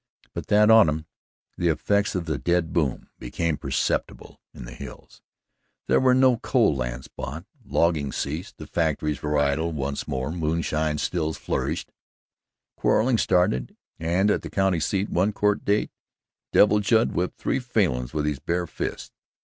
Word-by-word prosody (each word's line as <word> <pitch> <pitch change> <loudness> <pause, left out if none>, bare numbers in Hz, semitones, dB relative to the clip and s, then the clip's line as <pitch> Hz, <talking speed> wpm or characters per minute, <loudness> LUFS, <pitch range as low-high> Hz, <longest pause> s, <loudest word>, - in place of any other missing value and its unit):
But - - -6
that 105 +1 +5
autumn, 80 -9 +5 0.5
the 85 - +1
effects 100 +6 +1
of 90 -2 -2
the 80 -2 -2
dead 85 -2 0
boom 75 -7 -1
became 80 +6 -2
perceptible 75 - -3
in - - -10
the - - -9
hills. - - -11 0.6
There - - +3
were 130 -1 +4
no 130 0 +5
more 120 - -2
coal 120 - +2
lands - - -4
bought, 80 +7 -7 0.2
logging 80 -8 +1
ceased, 80 +8 -4
the - - -8
factions 75 -3 -1
were 75 0 0
idle 75 +3 +1
once 70 -2 -3
more, 65 +2 -2
moonshine 80 -2 -1
stills 80 -1 -2
flourished, - - -3 0.9
quarrelling 120 0 +2
started, 75 -9 +1 0.2
and 90 +5 +2
at - - 0
the - - -7
county 95 -3 +1
seat, 95 +5 0
one 95 +5 +1
Court 105 0 +1
day, 105 +1 +1 0.6
Devil 105 0 +5
Judd 110 +3 +2
whipped 90 +1 -2
three - - -1
Falins 90 - 0
with 75 -1 -2
his 75 -3 -1
bare 85 +4 -1
fists. - - -5
85 Hz, 155 wpm, -25 LUFS, 75-100 Hz, 0.9 s, that